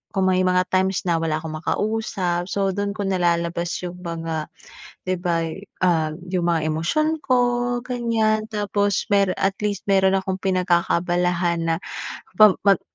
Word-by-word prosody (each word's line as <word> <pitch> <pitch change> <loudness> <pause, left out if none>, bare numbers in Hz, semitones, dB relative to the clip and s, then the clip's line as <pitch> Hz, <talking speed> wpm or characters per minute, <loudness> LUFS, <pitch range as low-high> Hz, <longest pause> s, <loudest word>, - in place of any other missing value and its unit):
kung 190 -1 +3
may 185 0 +2
mga 180 0 +3
times 190 0 +1
na 170 -2 +1
wala 160 -1 0
akong 155 -1 -5
makausap, 185 -2 -1
so 195 0 0
dun 200 +1 -2
ko 205 - -3
nalalabas 175 -2 0 0.2
yung 180 0 -6
mga, 165 -3 -4 0.6
'di 185 0 0
ba, 170 -2 0 0.4
ah, 165 -3 +2 0.2
'yung 180 0 -1
mga 165 -2 +1
emosyon 305 - 0
ko, 255 -3 +2 0.5
ganyan, 230 -3 +1
tapos 205 -1 0
mero 200 -1 +4
at 195 0 +1
least 205 -2 -2
meron 195 -1 +3
akong 190 0 -3
pinagkakaabalahan 175 -1 +1
na 165 - +2 0.6
pa 215 +3 +8 0.2
mag 195 -3 +5
185 Hz, 150 wpm, -22 LUFS, 170-200 Hz, 0.6 s, pa